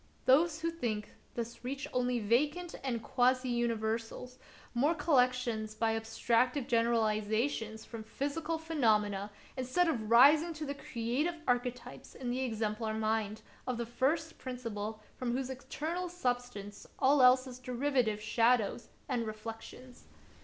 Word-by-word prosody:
Those 310 +4 +4
who 335 0 0
think 220 -10 -3 0.2
thus 235 0 -5
reach 270 +2 -4
only 250 0 +1
vacant 290 +11 +1
and 240 -4 -2
quasi 255 0 +2
universals, 235 +1 -2 0.3
mere 285 +7 +2
collec 280 -5 +4
tions 225 -4 -3
by 225 0 +1
abstractive 235 +4 +1
generalizations 225 -1 0
from 230 -2 -7
physical 290 +8 -3
phenomena, 215 -11 +1 0.3
instead 260 +8 +1
of 225 -9 -1
rising 295 +8 +7
to 305 0 -4
the 280 - -3
creative 265 +6 -2
archetypes 245 0 -2
in 250 -2 -3
the 255 +2 -1
exemplar 220 -2 -2
mind 220 -1 -1 0.2
of 250 -2 -1
the 235 - -2
First 310 +7 -1
Principle 220 -4 -5
from 245 -2 -2
whose 260 +1 -2
eternal 320 +7 -4
substance 245 - -3
all 275 +1 +4
else 255 +1 +6
is 255 -1 -9
derivative 250 -3 0
shadows 230 +1 +2 0.2
and 240 -4 -1
reflections. 225 +3 -9
245 Hz, 130 wpm, -32 LUFS, 225-270 Hz, 0.3 s, rising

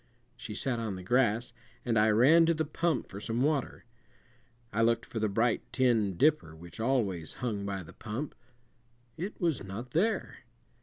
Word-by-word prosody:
She 115 -3 -7
sat 120 +1 -1
on 110 -4 -3
the 95 - -8
grass, 120 +2 +1 0.3
and 120 -2 +1
I 110 0 +4
ran 145 +10 +6
to 165 - +3
the 160 0 0
pump 165 +2 -1
for 100 - -8
some 115 +4 -1
water. 145 -5 -1 0.9
I 110 - +1
looked 115 0 +2
for 115 - -5
the 110 -1 +1
bright 115 +3 +1
tin 115 -8 +2
dipper 145 - +2
which 85 +3 -12
always 110 -9 0
hung 105 -5 -3
by 95 -2 -3
the 80 - -13
pump. 120 +7 -5 0.8
It 185 +6 -5
was 165 - 0
not 105 +6 -7
there. 215 - 0
115 Hz, 170 wpm, -30 LUFS, 105-135 Hz, 0.9 s, ran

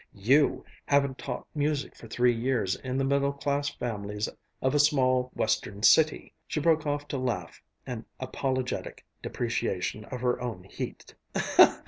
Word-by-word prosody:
You 130 +9 +3 0.2
haven't 140 -2 +2
taught - - -5
music 145 -1 -1
for 115 - -12
three 120 +2 +3
years 115 -5 0
in 130 0 -4
the 135 - +1
middle 140 +1 +2
class 140 0 -1
families 105 -5 -3 0.3
of 130 +1 +1
a 145 - +3
small 130 -4 +3
Western 105 -1 -1
city!" 155 +4 +4
She - - -1
broke 160 0 +2
off 145 0 -1
to 140 - -2
laugh 125 -2 -3 0.2
an 120 -4 -6
apologetic 130 0 -3 0.2
depreciation 110 -3 -2
of 125 +1 -6
her 125 -1 +1
own 115 -7 -4
heat. 95 - -7
130 Hz, 145 wpm, -28 LUFS, 115-140 Hz, 0.3 s, city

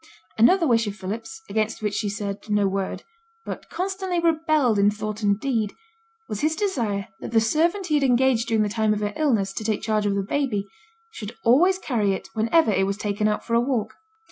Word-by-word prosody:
Another 335 - +5
wish 230 -5 +2
of 200 - -4
Philip's, 225 - -6
against 215 +1 -2
which 210 -1 0
she 210 0 -1
said 200 -1 -4
no 205 -1 +2
word, 195 0 -3 0.4
but - - -7
constantly 380 -1 -2
rebelled 310 -8 +2
in 200 +1 +5
thought 215 +1 -4
and 200 -1 +2
deed, 225 -6 -1 0.5
was 210 - -4
his 310 +1 +1
desire 235 - -1
that - - -6
the 230 - +4
servant 335 - +1
he 315 - -2
had - - -1
engaged 250 -2 +3
during 220 -2 +2
the - - 0
time 215 0 +1
of 210 - -4
her 205 0 -2
illness 225 -11 +1
to 220 - -4
take 215 -1 -1
charge 215 -2 +1
of 200 - 0
the 200 - 0
baby, 215 -3 -1 0.5
should 215 - -8
always 340 +11 +5
carry 220 - 0
it - - -6
whenever 230 +4 +3
it 195 -1 +2
was 200 0 -2
taken 210 0 -1
out 210 - -1
for 230 - -4
a 235 - +4
walk. 245 -4 -1
220 Hz, 210 wpm, -24 LUFS, 205-285 Hz, 0.5 s, Another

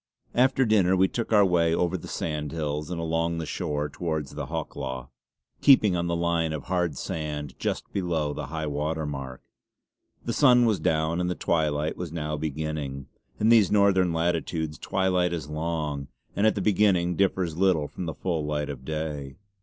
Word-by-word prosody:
After 130 +1 +3
dinner, 100 -5 +4
we 95 +1 +4
took 115 +4 -4
our 105 -2 +6
way 85 -3 +3
over 90 +1 0
the 90 - -6
sandhills 75 0 -3
and 90 -2 -3
along 85 +1 0
the 80 - -3
shore 75 0 -2
towards 80 -4 -3
the - - -5
Hawklaw, 65 -5 -5 0.5
keeping 110 -9 +6
on 85 0 -1
the 85 - 0
line 85 -1 0
of 75 - -4
hard 90 -6 -1
sand 75 -3 -4
just - - -3
below 80 -6 -1
high 80 +1 -4
water 75 +2 -2
mark. 70 -3 -6 0.8
The 115 - -1
sun 125 -3 +6
was 110 -4 +2
down 80 +2 +1
and 90 - 0
the 90 - -1
twilight 75 -2 0
was 90 -3 -5
now 75 -2 -3
beginning. 75 -3 -4 0.3
In 110 - +3
these 115 -4 +6
northern 100 -3 +4
latitudes 80 -2 -1
twilight 90 -2 +1
is 75 -4 -4
long, 75 -3 -2 0.3
and 105 +2 +3
at 110 - +2
the 100 - -1
beginning 95 -4 +3
differs 95 -3 +1
little 90 -5 +2
from 90 - -6
the 80 - -4
full 85 -4 -2
light 75 -1 -2
of 65 -2 -9
day. 75 -2 -4
80 Hz, 175 wpm, -26 LUFS, 75-90 Hz, 0.8 s, our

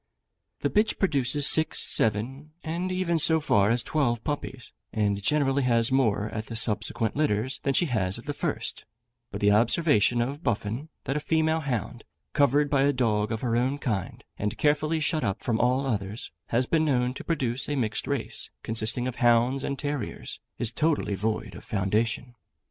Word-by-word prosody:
The - - 0
bitch 215 +1 +2
produces 145 -5 +2
six, 160 +2 +4
seven, 130 +8 0
and 175 +3 -3
even 180 -2 0
so 160 0 +4
far 105 -9 +3
as 120 0 +1
twelve 120 -7 0
puppies, 135 -4 -5 0.2
and 100 -2 0
generally 140 +3 +2
has 120 -2 +2
more 110 -6 +2
at 110 0 -5
the 115 - -6
subsequent 110 0 +1
litters 130 -4 0
than 135 -1 0
she 175 - +4
has 105 - +1
at 115 - -11
the 145 - -3
first; - - -4 0.4
but 100 -2 -6
the 105 0 +4
observation 120 +1 +3
of 135 +6 -2
Buffon, 115 +5 -2
that 135 - -2
a - - 0
female 160 +1 +1
hound, 130 - -3 0.3
covered 145 +1 +3
by 140 -1 +2
a 140 +1 +4
dog 110 -4 0
of 110 - -3
her 120 -2 0
own 130 +4 +1
kind, 105 -10 -3 0.2
and 105 0 -2
carefully 155 +2 +1
shut 155 0 0
up 100 -1 -2
from 115 -2 0
all 130 +3 +2
others, 105 -3 -3 0.2
has 120 +2 +1
been 160 +4 +1
known 125 -4 +1
to - - -8
produce 130 -6 -1
a 145 - 0
mixed 110 -5 -2
race, 140 -5 -3
consisting 115 +2 -1
of 130 - -5
hounds 120 +3 +3
and 140 - -2
terriers, 145 -5 -4 0.2
is 120 - 0
totally 155 -9 0
void 105 0 -2
of - - -10
foundation. 110 +5 -1
125 Hz, 180 wpm, -27 LUFS, 110-145 Hz, 0.4 s, six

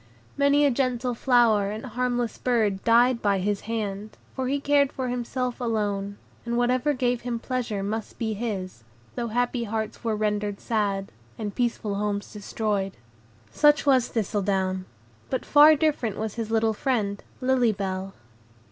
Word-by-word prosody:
Many 280 +1 +4
a 280 - +4
gentle 250 -1 0
flower 230 -5 +3
and 215 +4 -5
harmless 245 -1 -2
bird 215 -6 +1
died 235 +1 +4
by 200 -1 +2
his 200 +1 -1
hand, 210 -2 -4 0.2
for 260 -1 -2
he 280 +2 0
cared 280 -1 +3
for 260 -1 -3
himself 250 0 -3
alone, 205 -3 -1 0.3
and 235 0 -2
whatever 255 +4 +2
gave 245 -1 0
him 240 -1 -3
pleasure 230 -5 -3
must 215 +2 -4
be 220 -2 -1
his, 195 - -4 0.3
though 240 -1 -3
happy 245 +1 0
hearts 220 +1 -4
were 225 -2 0
rendered 210 -1 -1
sad, 200 -3 -1 0.3
and 210 -2 -4
peaceful 235 -4 -1
homes 205 0 -2
destroyed. 205 -2 -2 0.5
Such 295 - +4
was 260 -4 +4
Thistledown; 190 -3 -1 0.4
but 260 - -2
far 300 +1 +7
different 285 -9 0
was 220 -1 -3
his 225 -2 -4
little 225 0 +2
friend, 210 -4 -1 0.2
Lily 255 -3 +3
Bell. 195 -1 -4
225 Hz, 150 wpm, -25 LUFS, 205-250 Hz, 0.5 s, far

